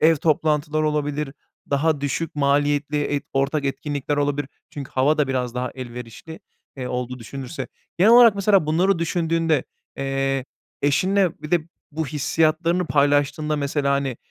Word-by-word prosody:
ev 160 +1 +5
toplantıları 155 0 +1
olabilir, 150 -1 -2 0.4
daha 145 +1 +1
düşük 145 +4 -2
maliyetli 145 +1 +1
et 145 0 -2
ortak 140 +2 0
etkinlikler 145 +1 -2
olabilir, 145 -1 0 0.2
çünkü 140 -2 -7
hava 145 +4 +2
da 145 -2 +2
biraz 125 -2 -2
daha 125 0 -2
elverişli, 125 - -9 0.4
eee, 130 -2 -4
olduğu 125 0 -4
düşünülürse... 135 +5 -7 0.3
Genel 210 +6 +6
olarak, 235 -3 +8
mesela, 200 -4 +3
bunları 175 +4 +2
düşündüğünde, 165 -3 0 0.3
eee, 135 -1 -1 0.4
eşinle 185 +6 +2
bir 150 - -7
de 175 -2 +3 0.3
bu 155 +1 -3
hissiyatlarını 160 +4 +1
paylaştığında 145 +1 +2
mesela, 140 -1 0
hani, 140 -3 -1
145 Hz, 140 wpm, -22 LUFS, 135-160 Hz, 0.4 s, olarak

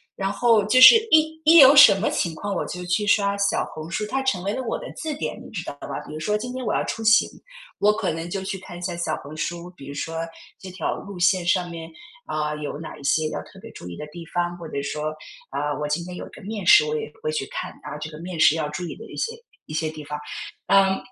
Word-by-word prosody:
然 195 0 -2
后 225 0 +3
就 255 +4 +4
是 260 - +11 0.2
一 315 0 +4
一 325 +2 +7
有 275 -1 +9
什 275 - +10
么 210 - +1
情 170 - -1
况 200 +4 -4
我 - - -1
就 180 0 -6
去 180 +4 0
刷 200 -1 +2
小 200 - +1
红 155 +1 -8
书， 210 - -2
它 270 0 -1
成 205 -9 0
为 200 - 0
了 260 - -3
我 235 - -3
的 - - -8
字 315 -2 -4
典， 300 - -4
你 - - -12
知 185 - -4
道 - - -6
吧？ - - -4
比 - - -9
如 155 - -6
说 210 +6 0
今 245 +3 -6
天 255 -1 -5
我 - - 0
要 - - +1
出 225 - -4
行， 225 +1 +5 0.5
我 210 - +5
可 210 -5 -1
能 165 +2 -5
就 195 +2 -3
去 190 0 -4
看 175 - -10
一 175 - -10
下 175 -1 -3
小 170 -2 -2
红 145 +3 -10
书， 170 +3 -4
比 140 -4 -11
如 - - -6
说 160 +3 -4 0.4
这 190 - -10
条 185 - -2
路 200 -3 -9
线 180 0 +3
上 175 0 +1
面， 165 -1 -8 0.4
啊， 150 0 -2
有 150 -1 -5
哪 165 - -8
一 - - -14
些 155 +3 +2
要 - - -4
特 - - -15
别 - - -10
注 90 - -10
意 85 - -8
的 150 - -7
地 165 +2 -10
方。 175 0 -1
或 170 -2 -9
者 140 - -3
说， 150 +2 -3 0.4
啊， 145 -1 -2
我 - - -1
今 150 +4 0
天 180 0 -8
有 - - -7
一 - - -12
个 - - -14
面 210 +1 -5
试， 420 +2 +7
我 460 0 -1
也 450 0 -4
都 - - -25
会 465 - -2
去 465 - -2
看， - - -4
啊， - - -6
这 155 +1 -5
个 155 - -10
面 175 0 -6
试 160 -1 +6
要 155 -2 -2
注 150 +4 -5
意 - - -6
的 - - -11
一 - - -9
些 460 - -2 0.3
一 - - -9
些 155 0 -1
地 155 0 -9
方。 150 +1 -5 0.5
嗯， 195 -1 +4
180 Hz, 300 characters per minute, -23 LUFS, 155-220 Hz, 0.5 s, 是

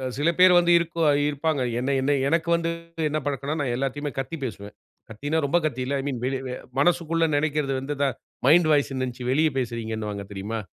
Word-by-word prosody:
அ - - -1
சில 150 +3 +2
பேரு 185 0 +8
வந்து 175 0 +4
இருக்குவா 165 -2 +1 0.2
இருப்பாங்க. 145 -1 -1 0.2
என்ன 135 +2 0
என்ன 140 +2 +2
எனக்கு 165 +2 +1
வந்து 165 0 -2 0.4
என்ன 155 +1 -1
பழக்கம்ன்னா, 145 +2 -2
நான் 125 -3 -1
எல்லாத்தையுமே 135 +2 -3
கத்தி 135 +5 -4
பேசுவேன். 100 -3 -7 0.4
கத்தின்னா 145 +8 -2
ரொம்ப 175 +5 +3
கத்தி 130 -4 -3
இல்ல. 140 +2 -1
ஐ - - -6
மீன் 125 -4 -3
வெளி 135 0 -1
வெ 125 - -4 0.3
மனசுக்குள்ள 165 0 +2
நினைக்கிறது 150 -2 0
வந்து 145 +2 -4
இத 140 - +2 0.4
மைண்ட் 160 +2 +6
வாய்ஸ்ன்னு 135 -2 +1
நினைச்சு 125 0 -6
வெளிய 155 +2 +3
பேசுறீங்கன்னுவாங்க 110 -4 -3
தெரியுமா? 105 +3 -4
140 Hz, 190 wpm, -25 LUFS, 125-160 Hz, 0.4 s, பேரு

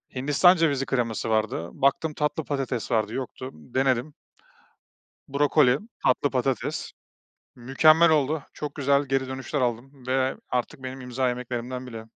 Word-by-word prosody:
Hindistan 145 +8 +4
cevizi 145 -5 +1
kreması 115 -4 -1
vardı. 110 -6 0
Baktım, 140 +3 +1
tatlı 150 +1 -1
patates 135 -4 -3
vardı, 110 -1 +1
yoktu, 130 0 -5
denedim, 130 +2 -1 1.2
brokoli, 140 -2 +3 0.3
tatlı 140 +3 +2
patates 130 -2 -2 0.6
mükemmel 155 +7 +5
oldu. 150 -1 +1
Çok 150 -1 -6
güzel 140 0 +2
geri 135 -1 -1
dönüşler 130 +1 -3
aldım 125 +2 -3
ve 130 0 +1
artık 125 +1 -3
benim 130 0 -6
imza 125 +1 -1
yemeklerimden 125 +1 -4
biri. 115 -2 -8
130 Hz, 130 wpm, -25 LUFS, 125-140 Hz, 1.2 s, mükemmel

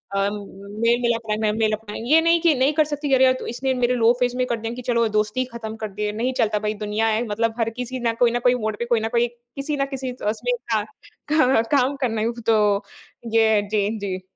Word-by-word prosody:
अ, - - +1
मेल-मिलाप 220 +3 -2
रहना 215 0 0
है। - - +2
मेल 220 -1 +2
अपना 215 -1 -6
ये 315 +3 +6
नहीं 335 +1 +3
कि 335 -3 +4
नहीं 265 +4 +2
कर 305 - +5
सकती 290 -2 -2
अरे 260 0 +5
यार 255 0 +1
इसने 260 +2 -1
मेरे 250 0 +1
लो 230 0 +4
फेज़ 245 0 +1
में 255 - +1
कर 235 - 0
दिया 230 +1 -4
कि 250 - -7
चलो 235 -2 +2
दोस्ती 210 +4 0
ही 255 - +1
ख़त्म 220 -1 -6
कर - - -1
दिए। 210 +1 -2
नहीं 240 +5 -2
चलता 210 -1 +2
भई, 210 0 -2
दुनिया 210 +1 -1
है, 220 +2 +1
मतलब 225 +2 0
हर 225 0 +1
किसी 250 +1 -4
ना 230 -1 0
कोई 235 - +5
ना 240 - 0
कोई 250 - +5
मोड़ 215 -1 -1
पे 235 - -1
कोई 235 -2 +2
ना 220 - -2
कोई 240 +1 +3
किसी 245 +5 -6
ना 275 - +1
किसी 260 -1 -3 0.2
उसमें - - -2 0.2
क - - +1 0.5
का 265 -7 +4 0.2
काम 270 +2 +1
करना 225 -3 0 0.2
तो 210 -2 +3 0.5
ये 220 -2 +4
जी, 205 -1 +1
जी। 190 -2 -4
230 Hz, 240 wpm, -22 LUFS, 215-255 Hz, 0.5 s, ये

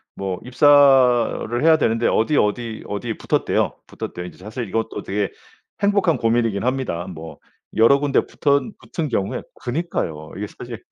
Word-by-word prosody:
뭐 95 -2 -4
입사를 125 -3 +4
해야 160 0 +6
되는데 115 -4 +1
어디, 140 +7 +2
어디, 110 +1 -1
어디 110 +2 -4
붙었대요. - - 0
붙었대요. 90 - -6
이제 90 - -10
사실 110 +4 -6
이것도 115 +3 -3
되게 100 0 -2 0.5
행복한 200 -5 +2
고민이긴 115 -3 +1
합니다. 125 -9 -1
뭐 80 -4 -9 0.4
여러 115 +6 +5
군데 145 -1 +1
붙은 140 +9 0
붙은 155 -4 -4
경우에 100 -4 -1
그니까요. 120 - -4
이게 105 - -4
사실 120 +1 -9
115 Hz, 340 characters per minute, -21 LUFS, 100-140 Hz, 0.5 s, 해야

